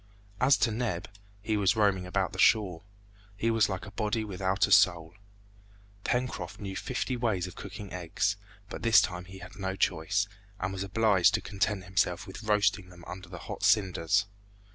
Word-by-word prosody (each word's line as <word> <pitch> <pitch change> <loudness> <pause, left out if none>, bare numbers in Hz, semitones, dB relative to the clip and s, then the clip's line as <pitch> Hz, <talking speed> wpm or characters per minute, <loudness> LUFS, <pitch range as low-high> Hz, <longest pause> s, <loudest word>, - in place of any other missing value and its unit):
As 130 +3 +5
to 115 - +2
Neb, 110 -6 -2 0.4
he 110 0 0
was 100 +1 +3
roaming 100 -4 +2
about 90 - -1
the - - -7
shore. 95 -6 +3 0.6
He 115 +2 +1
was 115 -2 +3
like 95 0 -4
a 105 - -10
body 110 +1 -1
without 95 -1 0
a 100 - -6
soul. 85 -5 +4 0.9
Pencroft 125 -8 -2
knew 95 -2 -5
fifty 130 +2 -2
ways 110 -7 0
of 90 - -8
cooking 100 0 -8
eggs, 90 +3 -1 0.3
but - - -7
this 115 -1 +6
time 90 0 -2
he 95 +1 -11
had 90 0 -11
no 95 0 -2
choice, 95 +3 +1 0.3
and 95 +1 -2
was 95 - -5
obliged 100 -2 +3
to - - -1
content 100 0 -1
himself 90 -1 0
with 95 +2 -9
roasting 105 -3 +1
them 90 -1 -14
under 90 -1 -9
the 90 - -8
hot - - -6
cinders. 100 -1 +3
100 Hz, 180 wpm, -29 LUFS, 90-105 Hz, 0.9 s, this